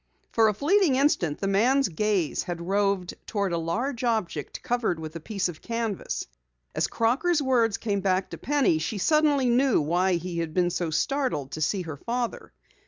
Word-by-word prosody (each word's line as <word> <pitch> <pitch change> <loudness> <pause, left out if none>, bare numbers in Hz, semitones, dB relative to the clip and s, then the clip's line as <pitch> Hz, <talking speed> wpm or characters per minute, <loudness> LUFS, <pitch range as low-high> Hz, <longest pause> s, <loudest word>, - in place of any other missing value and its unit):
For 225 -1 +4
a 215 - +2
fleeting 320 - +3
instant 230 - +2
the 195 - -1
man's 250 +8 +3
gaze 190 -2 0
had 175 -1 -5
roved 195 0 0
toward 200 -4 -1
a - - +1
large 235 +10 -2
object 215 - -2
covered 235 -9 0
with 160 0 -7
a - - -4
piece 195 +3 -2
of 165 -3 -8
canvas. 230 -4 -3 0.5
As - - 0
Crocker's 295 +9 +1
words 245 -6 +2
came 205 -3 -1
back 190 0 0
to - - -7
Penny, 280 - +2
she 205 +7 -3
suddenly 290 - +3
knew 250 +1 +3
why 175 +5 +1
he 175 0 -2
had 160 -2 -4
been 175 -1 +2
so 170 -1 -2
startled 160 - -1
to 155 - -5
see 185 +5 0
her 160 -4 -7
father. 240 - -3
205 Hz, 180 wpm, -26 LUFS, 170-250 Hz, 0.5 s, For